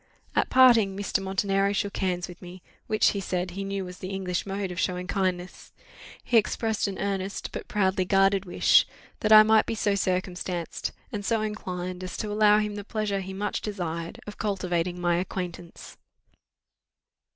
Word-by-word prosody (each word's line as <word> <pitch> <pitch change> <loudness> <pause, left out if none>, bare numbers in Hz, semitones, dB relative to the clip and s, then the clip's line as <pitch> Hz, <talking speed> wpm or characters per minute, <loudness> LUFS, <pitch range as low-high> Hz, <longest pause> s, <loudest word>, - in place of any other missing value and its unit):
At - - +2
parting, 230 -7 +5
Mr. 200 -1 -1
Montenero 195 +1 +1
shook 200 0 -2
hands 180 -2 -1
with 175 - -12
me, 180 0 -11 0.2
which, 215 0 +3
he 200 - -2
said, 180 -1 -2
he 195 +2 -5
knew 195 -1 -3
was 180 0 -10
the 185 - -6
English 190 -1 -3
mode 195 -1 -3
of 180 - -5
showing 180 0 -1
kindness: 185 -1 -3 0.5
he 240 - +3
expressed 220 0 +1
an 195 -1 -4
earnest, 195 0 -3
but - - -6
proudly 190 -2 +1
guarded 195 +1 +3
wish, 175 -3 +4 0.3
that 215 - 0
I 215 0 +11
might 220 0 +4
be 225 - -2
so 205 -2 +1
circumstanced, 180 -2 -2 0.2
and 205 - -4
so 225 +2 +1
inclined, 185 -4 -4
as 185 - -6
to 210 - -3
allow 210 0 +5
him 210 -1 -1
the 205 - -5
pleasure 210 -1 -2
he 190 0 -6
much 205 +2 -3
desired, 170 -5 -4
of 210 - -9
cultivating 180 -4 -1
my 175 -1 +1
acquaintance. 175 -1 -6
195 Hz, 175 wpm, -26 LUFS, 180-205 Hz, 0.5 s, I